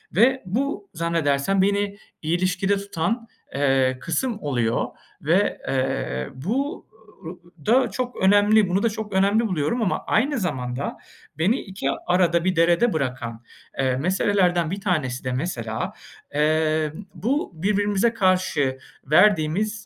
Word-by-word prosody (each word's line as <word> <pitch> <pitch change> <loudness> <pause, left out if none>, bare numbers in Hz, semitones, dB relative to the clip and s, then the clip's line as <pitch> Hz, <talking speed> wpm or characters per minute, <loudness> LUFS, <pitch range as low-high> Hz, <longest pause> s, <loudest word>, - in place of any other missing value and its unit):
Ve 255 +6 +4
bu 210 +1 -2
zannedersem 165 +1 +1
beni 200 +1 0 0.2
ilişkide 185 +4 +1
tutan, 200 +4 -2 0.3
eee, 135 -2 +2
kısım 220 +7 -2
oluyor. 120 - 0 0.4
Ve, 175 +7 +1
eee, 130 - -1
bu 265 - -3 0.4
ı - - -4
ı 175 -3 -18
da 255 +3 +4
çok 250 -1 -3
önemli. 205 +1 +4
Bunu 190 +3 +1
da 230 - +3
çok 215 -1 -6
önemli 200 +4 +3
buluyorum 185 +6 -1
ama 195 - 0
aynı 270 +4 +1
zamanda 130 - -3 0.4
beni 200 +10 +2
iki 190 -8 -5 0.2
arada 175 -1 +2
bir 185 -1 +1
derede 175 +8 +3
bırakan, 125 -5 -3 0.4
eee, 130 -1 +2
meselelerden 180 +1 +1
bir 195 +1 -4
tanesi 150 -10 -1
de 130 - -2
mesela, 120 -6 -3 0.4
emm, 155 +3 0
bu 245 - -1
birbirimize 205 +4 +1
karşı 185 -10 +1 0.3
verdiğimiz 205 +3 +3
180 Hz, 125 wpm, -23 LUFS, 150-205 Hz, 0.4 s, Ve